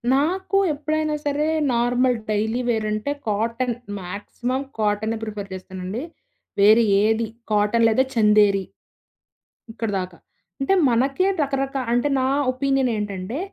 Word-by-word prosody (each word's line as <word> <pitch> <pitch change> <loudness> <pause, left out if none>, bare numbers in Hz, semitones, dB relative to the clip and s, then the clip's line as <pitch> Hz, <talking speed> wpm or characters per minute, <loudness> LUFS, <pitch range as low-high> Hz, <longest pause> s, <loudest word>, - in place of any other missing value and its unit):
నాకు 370 +7 0 0.2
ఎప్పుడైనా 310 +1 -1
సరే 295 +1 0 0.3
నార్మల్ 245 +1 +2
డైలీ 220 +3 0
వేర్ 220 -2 0
అంటే 215 +7 -2 0.2
కాటన్. 230 +4 0 0.3
మాక్సిమం 210 +8 -4 0.2
కాటనే 215 +1 0
ప్రిఫర్ 205 -2 -6
చేస్తానండి. 185 +5 -6 0.6
వేరే 215 +3 +6 0.2
ఏది, 220 +1 +1 0.2
కాటన్ 210 +2 +3
లేదా 225 +4 +3
'చందేరి' 210 -3 +4 1.1
ఇక్కడిదాకా. 195 -6 -3 0.4
అంటే 270 +7 +1 0.2
మనకే 270 +9 +2
రకరకా 275 -1 -1
అంటే 245 +4 +2
నా 260 - +1 0.2
ఒపీనియన్ 270 -1 +1
ఏంటంటే, 205 +4 -4
230 Hz, 110 wpm, -22 LUFS, 210-270 Hz, 1.1 s, వేరే